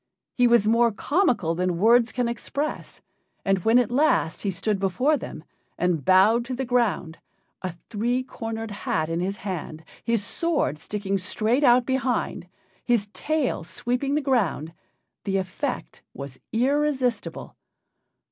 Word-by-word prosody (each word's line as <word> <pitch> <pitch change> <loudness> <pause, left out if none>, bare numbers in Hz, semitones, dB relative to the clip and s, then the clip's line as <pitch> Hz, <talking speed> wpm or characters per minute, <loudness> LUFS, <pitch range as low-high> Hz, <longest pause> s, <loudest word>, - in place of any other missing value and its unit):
He 245 -1 +4
was 235 -3 +4
more 230 +1 +4
comical 245 - +1
than 180 0 -1
words 230 +4 +4
can 245 +1 0
express, 280 +6 -4 0.4
and 195 -1 +2
when 225 +2 +5
at 245 -2 +2
last 255 - +2
he 200 - -1
stood 195 +2 -1
before 250 - +2
them, 155 - -7 0.3
and 175 -5 0
bowed 195 - +5
to 255 +1 -4
the 265 +1 -2
ground, 235 -9 0 0.4
a 185 -3 -4 0.2
three 240 +4 0
cornered 225 -3 -5
hat 160 -5 -2
in 165 +1 -1
his 195 +3 -2
hand, 160 -4 -5 0.2
his 230 -3 0
sword 310 - -1
sticking 200 +2 -2
straight 220 +8 0
out 245 -2 +5
behind, 260 -1 -1 0.4
his 230 -4 +1
tail 300 - -1
sweeping 250 - -1
the 300 - +1
ground, 200 - 0 0.5
the 195 -1 0
effect 195 +9 -4
was 140 -2 -8
irresistible. 260 0 0
225 Hz, 140 wpm, -25 LUFS, 190-250 Hz, 0.5 s, when